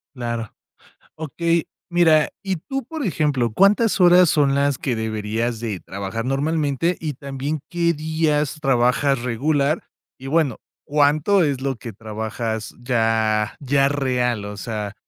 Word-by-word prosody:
Claro. 115 -3 -4 0.6
Okey, 165 +2 -1 0.2
mira, 165 -3 +4
y 190 -2 -2
tú, 270 - -5
por 305 +1 -5
ejemplo, 145 - 0
¿cuántas 200 - +3
horas 180 -1 +7
son 140 -2 +3
las 140 -1 +1
que 130 - -2
deberías 110 +1 -2
de 105 -5 -3
trabajar 100 +5 -5
normalmente 145 +4 0
y 155 -2 -3
también 140 +2 -4
qué 170 -1 +1
días 155 -1 0
trabajas 135 0 +2
regular? 140 +5 0 0.3
Y 135 - -9
bueno, 145 -5 +1 0.3
¿cuánto 150 +6 +3
es 140 -3 -1
lo 135 -3 -2
que 115 -1 -8
trabajas 110 +1 -4
ya 110 -3 +1
ya 140 0 +2
real, 125 -6 0
o 105 0 -7
sea, 105 -1 -4
140 Hz, 135 wpm, -21 LUFS, 115-155 Hz, 0.6 s, horas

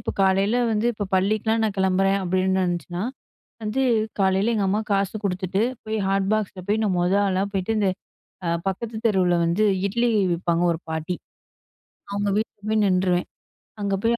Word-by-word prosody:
இப்ப - - -3
காலையில 195 +4 +3 0.2
வந்து 215 +2 +1
இப்ப 205 -2 -4
பள்ளிக்கலாம் 215 +4 +1
நான் 210 -2 -1
கிளம்புறேன், 195 +1 +2
அப்டின்னு 185 +1 +1
இருந்துச்சுனா, 175 0 -3 0.6
வந்து 215 +5 -1 0.4
காலையில 195 +4 +2
எங்க 205 -3 +1
அம்மா 205 +3 +1
காசு 195 +1 0
குடுத்துட்டு, 190 +1 0 0.2
போய் 220 0 -2
ஹாட் 195 0 +1
பாக்ஸில 205 -4 -1
போய் 215 +2 +2
நான் 195 - +1
மொத 180 +2 +2
ஆளா 190 0 +1
போய்ட்டு, 195 +3 0
இந்த 200 - +2 0.6
அ - - 0 0.2
பக்கத்து 220 +4 -3
தெருவுல 185 -4 +2
வந்து 185 +6 +2 0.2
இட்லி 235 +4 +1 0.2
விப்பாங்க 170 0 0
1 165 +1 -3
பாட்டி. 160 +3 -2 1.0
அவங்க 200 0 -1
வீட்டுல 215 -1 -3
போய் 215 -1 +3
நின்றுவேன். 185 -2 +2 0.5
அங்க 200 -1 -1
போய் 230 +1 +3
195 Hz, 160 wpm, -24 LUFS, 185-215 Hz, 1.0 s, காலையில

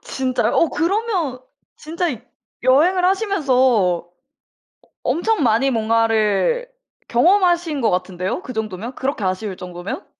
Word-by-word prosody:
진짜요? 260 -1 -1
어 335 - +3
그러면 345 - -1 0.4
진짜 330 +3 -3 0.6
여행을 325 +9 +3
하시면서 385 -7 +1
어 190 -9 +2 0.9
엄청 350 -1 0
많이 245 +4 +2
뭔가를 225 - +1 0.4
경험하신 345 +1 +2
것 230 - +2
같은데요? 185 - -2
그 255 - -7
정도면 220 +3 -5
그렇게 265 -5 -3
아쉬울 190 +1 -2
정도면? 180 - -7
255 Hz, 270 characters per minute, -20 LUFS, 215-345 Hz, 0.9 s, 어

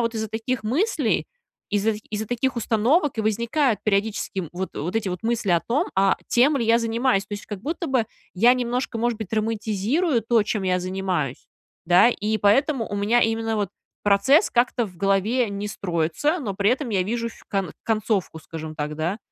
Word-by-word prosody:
вот 230 0 -1
из-за 220 -1 -2
таких 225 +2 -3
мыслей, 330 - +1 0.4
из-за 210 +2 +2 0.2
из-за 215 +1 -3
таких 245 +3 -1
установок 235 - +1
и - - +3
возникают 230 +4 +1
периодически, 205 -1 0
м, 170 - -6
вот 185 +2 -4
вот 175 +8 -3
эти 220 -3 -1
вот 180 +3 -5
мысли 230 -3 0
о 170 -1 +4
том, 280 - 0
а 195 0 +4
тем 275 +5 +4
ли 235 - 0
я 230 +1 +4
занимаюсь. 230 -2 +1
То 205 - -5
есть, 205 - -8
как 210 -3 -6
будто 330 - -3
бы 255 -5 +1 0.3
я 235 +7 +5
немножко, 250 0 -2
может 235 -1 0
быть, 220 -3 -7
романтизирую 225 - 0
то, 230 -1 +3
чем 210 -1 -2
я 185 -1 +1
занимаюсь, 185 -7 -2 0.4
да, 180 +6 +6
и 215 -2 -1
поэтому 235 - +2
у - - -4
меня 215 +4 +3
именно 225 0 0
вот 205 -2 -1 0.4
процесс 210 - +4
как-то 240 -1 +1
в 180 -3 -14
голове 200 +6 +1
не 200 +1 -4
строится, 180 - -1
но 215 - -4
при 200 +3 +2
этом 260 +1 -1
я 195 -3 +2
вижу 230 +4 -2
фь 230 - -15
кон 195 -3 -1
концовку, 215 -6 -1
скажем 160 -1 -8
так, 150 0 -3
да. 170 +6 -2
220 Hz, 195 wpm, -23 LUFS, 195-240 Hz, 0.4 s, да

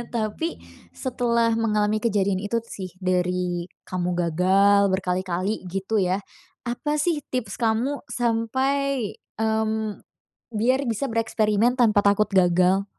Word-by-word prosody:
Tapi, 220 +9 -1 0.4
setelah 235 -3 0
mengalami 215 -1 +1
kejadian 200 -4 +1
itu 210 +3 -1
sih, 185 -5 -8
dari 180 -1 0 0.2
kamu 180 -1 -2
gagal 190 +4 +3
berkali-kali, 185 +1 -1
gitu 195 +4 -2
ya, 190 0 +1 0.4
apa 295 +5 -2
sih 315 -3 0
tips 250 -3 -3
kamu 235 +5 0
sampai, 260 +2 0 0.3
mmm, 220 -1 -1 0.5
biar 250 +5 +2
bisa 230 +3 -1
bereksperimen 225 0 +2
tanpa 215 -4 +4
takut 205 +1 +3
gagal? 185 +1 +3
210 Hz, 110 wpm, -24 LUFS, 190-235 Hz, 0.5 s, tanpa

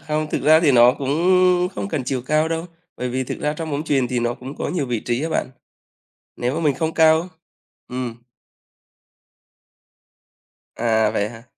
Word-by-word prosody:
không, 155 0 -2
thực - - -2
ra 155 +2 +6
thì 150 -5 +4
nó 120 0 +7
cũng 135 -1 -2 0.6
không 200 - -4
cần 145 -8 -3
chiều 125 -1 -2
cao 155 +1 +2
đâu, 165 +1 -3 0.3
bởi 125 - -3
vì 130 +1 -2
thực - - -6
ra 150 - 0
trong 160 0 -5
bóng 145 +2 -2
chuyền 135 -5 +1
thì 125 - -1
nó 120 0 -1
cũng 130 +3 -9
có - - -3
nhiều 155 -7 -2
vị 120 -3 -2
trí 120 +5 -2
á 165 - -1
bạn. 160 - -2 0.9
Nếu 125 +4 -2
mà 165 - -2
mình 145 -4 +2
không 160 +3 -2
cao. 160 +2 +4 0.6
Ừm. 125 -2 -4 2.6
À, 110 -2 +1
vậy 105 -1 -1
hả? 115 -1 -12
135 Hz, 185 wpm, -21 LUFS, 120-155 Hz, 2.6 s, nó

